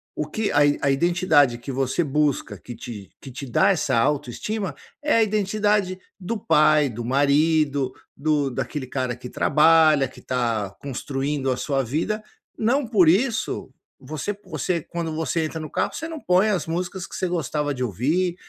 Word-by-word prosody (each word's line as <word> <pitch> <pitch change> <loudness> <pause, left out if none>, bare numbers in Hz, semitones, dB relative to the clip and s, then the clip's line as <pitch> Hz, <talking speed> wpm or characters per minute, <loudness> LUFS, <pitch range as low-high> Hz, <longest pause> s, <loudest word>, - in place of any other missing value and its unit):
o 150 - -2
que 215 +7 -2
a - - +3 0.2
a 140 - +2
identidade 150 -4 +3
que 120 +4 -7
você 135 +5 0
busca 150 -1 0
que 120 - -10
te 105 -6 -9
que 135 - -9
te 130 +3 -7
dá 190 +11 +4
essa 145 -9 +1
autoestima 150 - -1 0.3
é 300 - +2
a 230 - +5
identidade 205 -2 +1 0.2
do 215 +4 -3
pai, 155 -5 +4
do 120 0 -6
marido, 145 0 +2 0.3
do 145 -1 +1
daquele 130 +2 -4
cara 130 -2 -2
que 125 0 -9
trabalha, 155 -2 +4
que 130 - -15
está 115 -5 -1
construindo 135 0 -3
a 125 - -1
sua 135 +1 0
vida. 165 - -2 0.4
Não 250 +5 +1
por 200 -7 +4
isso, 220 - 0 0.3
você 155 +8 -4
p 205 - -21
você 165 +2 -1
quando 170 -2 -4
você 160 0 -1
entra 160 +1 -5
no 155 -1 -6
carro - - -1
você 325 - -5
não 325 -1 -6
põe 190 -1 +3
as 180 -7 0
músicas 180 +2 -3
que - - -10
você 185 - -1
gostava 150 -4 -1
de 130 - -3
ouvir, 155 - 0
155 Hz, 175 wpm, -23 LUFS, 135-185 Hz, 0.4 s, a